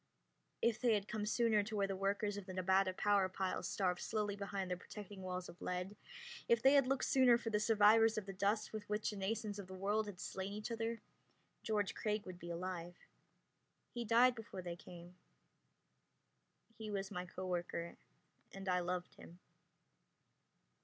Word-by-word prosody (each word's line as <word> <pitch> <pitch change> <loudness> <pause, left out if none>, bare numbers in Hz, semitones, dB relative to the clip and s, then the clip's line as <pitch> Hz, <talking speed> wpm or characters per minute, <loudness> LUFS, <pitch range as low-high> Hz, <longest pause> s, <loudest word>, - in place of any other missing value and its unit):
If 235 -1 +2
they 240 -3 +4
had 205 -1 -2
come 210 -2 -2
sooner 225 -2 +3
to 215 +2 -5
where 200 -1 +2
the 195 0 -2
workers 200 +2 0
of 205 -1 -7
the 185 - -6
Nevada 190 +1 +3
power 200 0 +2
pile 185 0 -2
starved 180 -3 0
slowly 210 -2 -1
behind 200 -2 -3
their 180 - 0
protecting 200 +1 -9
walls 180 -1 -4
of 175 - -12
lead 180 +3 -3 0.5
if 235 - +5
they 265 +3 +6
had 275 -3 +5
looked 270 0 +1
sooner 255 -3 +6
for 225 -2 -3
survivors 220 +1 +5
of 215 - -2
the 195 - -6
dust 205 +4 0
with 210 -1 -6
which 210 +1 0
the - - -6
nations 205 +1 -2
of 195 - -7
the 190 - -8
world 205 +3 0
had 195 -3 -8
slain 190 +2 -4
each 210 +3 -5
other 230 0 -2 0.6
George 210 -3 0
Craig 210 -1 -1
would 185 -1 -8
be 170 - -8
alive. 175 0 -4 1.0
He 240 - -2
died 235 +3 +5
before 215 -5 -8
they 175 -1 -4
came. 175 +1 -12 1.6
He 220 -1 -5
was 195 -1 -3
my 180 0 -4
co 185 +1 -6
worker, 175 -1 -3 0.6
and 195 0 -8
I 180 -1 +3
loved 180 0 -3
him. 170 - -13
200 Hz, 180 wpm, -38 LUFS, 185-215 Hz, 1.6 s, they